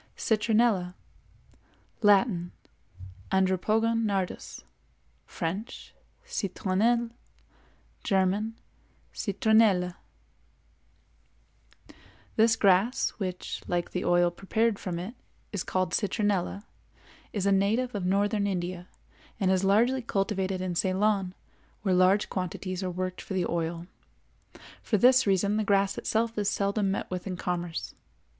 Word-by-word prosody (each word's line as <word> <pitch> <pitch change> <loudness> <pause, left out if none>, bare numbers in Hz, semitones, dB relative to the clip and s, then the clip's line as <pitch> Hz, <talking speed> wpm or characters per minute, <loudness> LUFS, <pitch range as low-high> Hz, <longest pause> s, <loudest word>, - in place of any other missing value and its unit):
CITRONELLA. 215 -4 +1 1.1
Latin—Andropogon 190 - 0
Nardus; 195 -4 -3 0.6
French—Citronelle; 215 - -2 0.9
German—Citronella. 200 0 0 2.4
This 225 +1 +4
grass, 200 +5 +3
which, 185 -3 -4
like 175 -1 -1
the 180 - -2
oil 175 0 +3
prepared 215 +4 0
from 175 -3 -4
it, 185 +7 -5 0.4
is 200 - -2
called 185 -2 -1
citronella, 205 -1 -1 0.7
is 200 -2 -2
a 200 - +3
native 215 +6 +1
of 205 -3 -3
northern 200 +2 +1
India, 180 -1 -3 0.5
and 190 -3 +2
is 190 0 +2
largely 235 +7 +3
cultivated 195 -4 -1
in 185 -1 -2
Ceylon, 190 +1 +1 0.5
where 190 -3 +2
large 185 +3 +4
quantities 185 0 -4
are 185 - -2
worked 185 +1 -4
for 195 - -6
the 180 -2 +1
oil; 170 0 -2 1.0
for 215 - 0
this 255 +2 +5
reason 200 +2 +2
the 215 - +1
grass 200 -2 +2
itself 225 0 -1
is 205 -1 +1
seldom 200 0 0
met 195 - -3
with 185 +1 -4
in 185 -2 -4
commerce. 175 -2 -3
195 Hz, 105 wpm, -28 LUFS, 185-215 Hz, 2.4 s, this